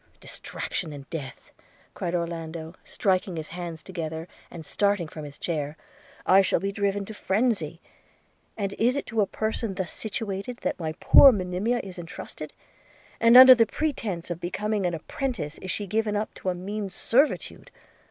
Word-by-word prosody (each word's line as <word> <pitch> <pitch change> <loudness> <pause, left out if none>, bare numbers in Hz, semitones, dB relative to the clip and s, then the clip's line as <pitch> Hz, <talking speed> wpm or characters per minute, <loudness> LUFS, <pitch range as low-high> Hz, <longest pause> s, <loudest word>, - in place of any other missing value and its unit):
'Distraction 165 -5 -5
and 140 -2 -9
death!' 140 -6 -7 0.4
cried 175 0 -3
Orlando 165 -1 -4
striking 185 -2 0
his 155 -1 -5
hands 170 -2 -6
together, 165 -3 -5 0.2
and 165 -3 -9
starting 200 +3 +1
from 155 -1 -8
his 145 -1 -10
chair, 150 -3 -3 0.5
'I 190 +1 +7
shall 190 - +1
be 195 0 -2
driven 200 0 -1
to 220 - -8
phrensy! 195 -6 0 0.4
– - - -40
And 200 -2 -2
is 245 +4 +3
it 285 - -2
to 225 -2 0
a 200 - +2
person 220 -1 -2
thus 185 -3 -3
situated 220 +1 -4
that - - -1
my 160 -2 -3
poor 275 - +9
Monimia 200 +4 -1
is 185 -2 -8
entrusted? 165 0 -8 0.7
and, 230 +2 +7
under 260 0 +12
the 230 -3 +3
pretence 215 - -3
of 170 - -4
becoming 205 +2 -1
an 175 - -2
apprentice, 165 - -4
is 185 - -7
she 205 - -1
given 215 +1 0
up 210 +1 -2
to 185 - -4
a 180 - -1
mean 200 +3 -4
servitude? 255 +10 0
190 Hz, 170 wpm, -26 LUFS, 170-215 Hz, 0.7 s, under